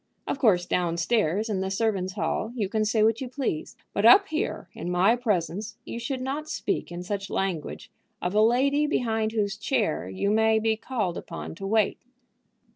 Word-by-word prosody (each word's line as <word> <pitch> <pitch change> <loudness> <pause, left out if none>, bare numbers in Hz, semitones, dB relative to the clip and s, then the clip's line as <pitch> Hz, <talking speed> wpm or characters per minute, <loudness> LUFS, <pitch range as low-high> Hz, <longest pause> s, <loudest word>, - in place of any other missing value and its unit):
Of - - -3
course, 180 -7 +4
down 175 -2 0
stairs, 205 +2 +1
in 200 -4 -1
the 190 - -1
servants' 195 -2 0
hall, 220 +5 -2
you 215 -5 -1
can 215 +2 0
say 215 0 +2
what 225 +2 +2
you 260 - -4
please; 250 - -3 0.2
but 200 - 0
up 320 - +7
here, 315 +1 -2
in 175 - -5
my 185 +6 +4
presence, 210 -2 -2
you 235 - -5
should 255 +2 -3
not 285 +4 -3
speak - - -2
in 175 +1 -5
such 200 +1 -4
language 185 -6 -3 0.3
of 180 +1 -2
a 210 - +4
lady 275 +6 +3
behind 225 -6 0
whose 210 -2 -1
chair 210 - -1
you 200 - -1
may 220 +1 +4
be 220 0 +1
called 220 -6 -2
upon 170 - -7
to 195 +4 -6
wait." 215 0 +2
215 Hz, 190 wpm, -26 LUFS, 190-235 Hz, 0.3 s, up